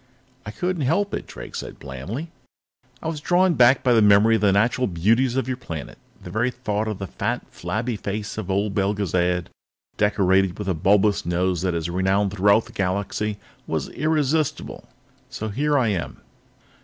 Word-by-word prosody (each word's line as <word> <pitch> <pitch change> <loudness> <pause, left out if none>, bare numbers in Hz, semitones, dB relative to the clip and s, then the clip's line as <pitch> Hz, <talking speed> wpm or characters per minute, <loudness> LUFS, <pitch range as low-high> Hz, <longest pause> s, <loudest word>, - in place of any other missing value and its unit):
"I - - -3
couldn't 180 +9 -2
help 185 +9 +1
it," - - -4
Drake - - -10
said - - -6
blandly. 95 - -6 0.7
"I - - -3
was 160 -2 -3
drawn 180 +2 +3
back 125 -1 +5
by 125 - +4
the 115 - +5
memory 105 +2 +6
of 110 - +2
the 100 -2 +4
natural 115 +5 +2
beauties 115 +9 +2
of 135 -2 0
your 130 -1 -2
planet. 80 - -7 0.2
The - - -8
very 115 +4 +1
thought 110 -4 -3
of 105 -3 -3
the 95 - -5
fat, - - -3
flabby 110 +6 -3
face 100 0 -4
of 90 - -6
old 100 +1 0
Belgezad, 90 -3 0 0.5
decorated 95 -3 +2
with 105 - -5
a 95 - +2
bulbous 100 +5 +2
nose 90 0 0
that 90 -2 0
is 85 0 -2
renowned 95 +3 +1
throughout 100 +3 +4
the - - -14
Galaxy, 100 +2 -2 0.3
was - - -2
irresistible. 155 -1 -1 0.4
So 110 - -5
here 145 +7 +1
I 120 -5 +2
am." 90 -6 -3
105 Hz, 175 wpm, -23 LUFS, 95-125 Hz, 0.7 s, memory